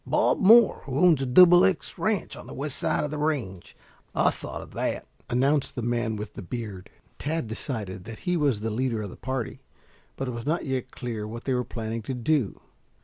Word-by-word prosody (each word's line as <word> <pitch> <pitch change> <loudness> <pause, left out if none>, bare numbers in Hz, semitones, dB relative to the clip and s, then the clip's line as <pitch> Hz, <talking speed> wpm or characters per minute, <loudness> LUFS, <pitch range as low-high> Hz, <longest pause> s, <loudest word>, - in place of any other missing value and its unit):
"Bob - - +2
Moore, 225 +3 +6
who 135 -1 -2
owns 170 -3 +5
the 135 - -1
Double 175 +7 +8
X 190 -1 0
Ranch 200 +1 -1
on - - -11
the - - -8
west 140 +1 -3
side - - 0
of 150 - -3
the 150 - -3
range. 130 - -2 0.4
I - - +4
saw - - -6
to - - -7
that," - - -3 0.2
announced 135 +4 +1
the 120 - -3
man 120 -1 0
with 105 0 -6
the - - -7
beard. 100 -2 -6 0.3
Tad 160 -1 -2
decided 105 -5 -4
that 115 -1 -9
he 180 -1 +1
was 140 -10 +1
the 110 +1 -2
leader 115 -1 -1
of 100 - -6
the - - -10
party, 130 -3 -4 0.6
but 135 - -3
it - - -2
was 115 +2 -6
not 165 +2 0
yet 130 -2 -2
clear 115 -5 -5
what 115 +2 -7
they 135 - 0
were 125 0 +1
planning 115 -1 -4
to 130 +4 -4
do. 125 -2 0
125 Hz, 215 wpm, -26 LUFS, 110-150 Hz, 0.6 s, Double